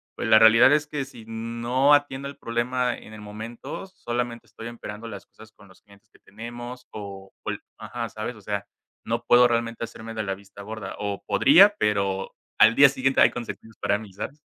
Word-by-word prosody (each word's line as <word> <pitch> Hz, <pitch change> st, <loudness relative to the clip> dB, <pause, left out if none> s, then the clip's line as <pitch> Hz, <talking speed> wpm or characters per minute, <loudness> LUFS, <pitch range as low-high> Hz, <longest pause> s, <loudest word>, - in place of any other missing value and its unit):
Pues -, -, -3 dB
la 110 Hz, 0 st, +8 dB
realidad 115 Hz, +4 st, +7 dB
es 150 Hz, 0 st, +1 dB
que 145 Hz, -2 st, -3 dB
si 115 Hz, -5 st, -13 dB
no 115 Hz, +5 st, +1 dB
atiendo 140 Hz, -1 st, +1 dB
el 140 Hz, -, -11 dB
problema 120 Hz, +1 st, -1 dB
en 110 Hz, -, -13 dB
el 110 Hz, -, -10 dB
momento, 110 Hz, -, -7 dB
solamente 120 Hz, -8 st, -4 dB
estoy 115 Hz, -, -9 dB
empeorando 115 Hz, -1 st, -8 dB
las 100 Hz, -3 st, -9 dB
cosas 110 Hz, 0 st, -17 dB
con 105 Hz, -2 st, -19 dB
los 95 Hz, -, -20 dB
clientes 100 Hz, +1 st, -22 dB
que -, -, -23 dB
tenemos 120 Hz, +4 st, -9 dB
o 100 Hz, -2 st, -9 dB
cual -, -, -4 dB, 0.2 s
Ajá, 115 Hz, -, -5 dB
¿sabes? 110 Hz, +3 st, -5 dB
O -, -, -14 dB
sea, 100 Hz, 0 st, -3 dB, 0.4 s
no -, -, -2 dB
puedo 125 Hz, 0 st, +6 dB
realmente 115 Hz, 0 st, -1 dB
hacerme 115 Hz, 0 st, -8 dB
de 110 Hz, -, -2 dB
la 95 Hz, -1 st, -2 dB
vista 100 Hz, +1 st, -12 dB
gorda 105 Hz, -2 st, -7 dB
o 100 Hz, -1 st, -4 dB
podría, 195 Hz, +9 st, +6 dB
pero 100 Hz, -, 0 dB, 0.2 s
al 110 Hz, -, +7 dB
día 140 Hz, 0 st, +9 dB
siguiente 135 Hz, 0 st, 0 dB
hay -, -, +7 dB
consecuencias 115 Hz, -2 st, -8 dB
para -, -, +2 dB
mí, 105 Hz, -3 st, -12 dB
¿sabes? 140 Hz, +9 st, -7 dB
115 Hz, 200 wpm, -25 LUFS, 105-125 Hz, 0.4 s, día